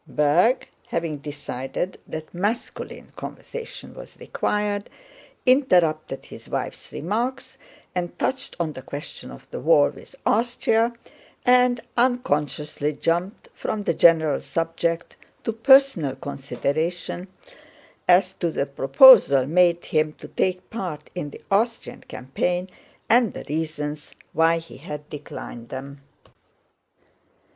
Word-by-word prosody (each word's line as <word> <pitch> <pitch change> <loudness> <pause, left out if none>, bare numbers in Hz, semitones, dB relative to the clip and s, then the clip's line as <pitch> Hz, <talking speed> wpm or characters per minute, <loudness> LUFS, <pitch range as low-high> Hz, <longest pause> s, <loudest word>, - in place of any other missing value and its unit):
Berg, 170 - +3 0.2
having 165 -3 -2
decided 145 +3 -5
that 155 0 -7
masculine 205 +7 -4
conversation 475 +1 -8
was - - -12
required, 205 -1 -1 0.6
interrupted 180 - +3
his - - -12
wife's - - -4
remarks 230 - -3 0.3
and 175 -1 -3
touched 265 - -2
on 160 -3 -1
the 130 - -8
question 145 +4 -8
of - - -12
the - - -4
war - - +4
with - - -15
Austria, 230 0 +2 0.5
and 250 -1 +4
unconsciously 150 - 0
jumped 175 +6 -1
from 210 -1 -3
the - - +1
general 160 -4 +4
subject 165 +1 -2 0.3
to 225 - -1
personal 230 - +5
considerations 155 +6 -3 0.8
as 185 +1 +5
to 175 - -1
the 140 - -1
proposals 140 - +7
made 175 +1 +3
him 155 -1 +1
to - - -11
take 185 0 -1
part 180 -9 -5
in 175 -5 -4
the - - -13
Austrian 225 +4 0
campaign 175 +8 -2 0.4
and 235 -1 +4
the - - -7
reasons 150 -1 -4 0.2
why 165 +1 +4
he 165 0 -10
had 150 0 -8
declined 120 -5 -8
them. 140 +1 -7
170 Hz, 115 wpm, -24 LUFS, 150-220 Hz, 0.8 s, proposals